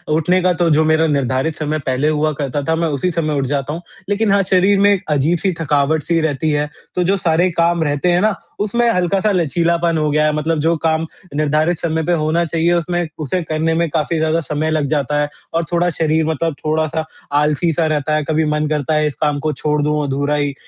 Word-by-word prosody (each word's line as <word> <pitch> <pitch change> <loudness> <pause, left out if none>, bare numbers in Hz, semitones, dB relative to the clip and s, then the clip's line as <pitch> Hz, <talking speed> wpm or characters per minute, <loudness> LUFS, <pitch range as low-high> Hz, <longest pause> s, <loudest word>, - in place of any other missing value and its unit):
उठने 180 +4 +2
का 180 0 +3
तो 170 - +3
जो 155 0 +4
मेरा 160 +1 +3
निर्धारित 140 +1 0
समय 155 0 -2
पहले 130 +3 +1
हुआ 155 0 +1
करता 140 0 -2
था, 160 +3 0
मैं 165 0 0
उसी 150 +5 -1
समय 155 -2 -1
उठ 135 - -1
जाता 140 +1 -2
हूँ। 170 - -6 0.3
लेकिन 205 0 +1
हाँ, 200 - +4
शरीर 195 +2 +3
में 205 +1 +5
एक 200 0 -2
अजीब-सी 170 +6 +1
थकावट 150 0 +1
सी 170 -1 +1
रहती 155 0 -1
है। 150 0 0 0.3
तो 180 - +1
जो 195 +3 +1
सारे 175 +1 +2
काम 170 0 +1
रहते 145 +4 0
हैं 175 +2 +2
ना 215 -1 +2 0.3
उसमें 235 +3 +1
हल्का-सा 190 +2 +1
लचीलापन 170 -1 +1
हो 150 -1 +1
गया 150 +1 +2
है। 150 - +2
मतलब 155 +1 -1
जो 165 +3 +2
काम 160 0 +1 0.3
निर्धारित 155 +3 +1
समय 160 -1 -1
पे 175 - +1
होना 165 +3 +1
चाहिए 165 +1 +1
उसमें 175 0 -1
उसे 160 +5 -2
करने 160 +1 0
में 170 -1 +1
काफ़ी 160 +2 -1
ज़्यादा 160 +1 +1
समय 155 +1 -1
लग 155 -2 +1
जाता 145 -1 0
है 145 - -1 0.2
और 165 +1 +1
थोड़ा 175 +1 +2
शरीर 160 0 +1
मतलब 160 0 -1
थोड़ा-सा 155 0 0 0.4
आलसी 150 +3 +1
सा 165 +1 +1
रहता 155 -1 0
है। 155 - 0
कभी 160 0 +2
मन 150 0 0
करता 150 0 -1
है 150 0 +2
इस 150 - -4
काम 145 -1 +1
को 155 +1 -1
छोड़ 150 +2 -1
दूँ 150 0 0
अधूरा 140 +1 -1
ही। 145 -1 -1
160 Hz, 225 wpm, -18 LUFS, 150-170 Hz, 0.4 s, में